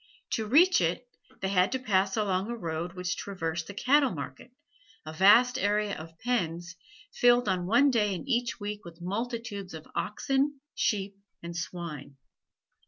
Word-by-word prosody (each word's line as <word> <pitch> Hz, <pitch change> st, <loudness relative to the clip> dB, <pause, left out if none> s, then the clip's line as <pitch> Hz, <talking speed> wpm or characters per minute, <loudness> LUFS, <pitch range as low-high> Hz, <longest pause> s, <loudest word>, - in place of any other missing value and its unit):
To 220 Hz, -1 st, -1 dB
reach 330 Hz, -, +5 dB
it, 175 Hz, +8 st, -1 dB, 0.3 s
they 190 Hz, -, -1 dB
had 185 Hz, -1 st, +3 dB
to -, -, +1 dB
pass 195 Hz, -5 st, +1 dB
along 195 Hz, -1 st, 0 dB
a 235 Hz, -, -3 dB
road 170 Hz, -2 st, -4 dB
which 180 Hz, -1 st, -3 dB
traversed 165 Hz, -4 st, -4 dB
the 200 Hz, -, -8 dB
cattle 275 Hz, +5 st, +4 dB
market, 245 Hz, -, -7 dB, 0.5 s
a 155 Hz, -, -7 dB
vast 235 Hz, +9 st, +5 dB
area 205 Hz, -1 st, +1 dB
of 165 Hz, +1 st, -10 dB
pens, 175 Hz, -8 st, -2 dB, 0.4 s
filled 245 Hz, -1 st, +4 dB
on 180 Hz, -2 st, 0 dB
one 275 Hz, +7 st, +5 dB
day 210 Hz, -5 st, +1 dB
in 185 Hz, -, -7 dB
each 240 Hz, -2 st, 0 dB
week 205 Hz, 0 st, -5 dB
with 170 Hz, -1 st, -12 dB
multitudes 205 Hz, 0 st, -4 dB
of 160 Hz, -, -9 dB
oxen, 275 Hz, +6 st, -1 dB
sheep, 200 Hz, -2 st, -1 dB, 0.3 s
and 170 Hz, 0 st, -6 dB
swine. 160 Hz, -5 st, -6 dB
200 Hz, 160 wpm, -29 LUFS, 175-240 Hz, 0.5 s, reach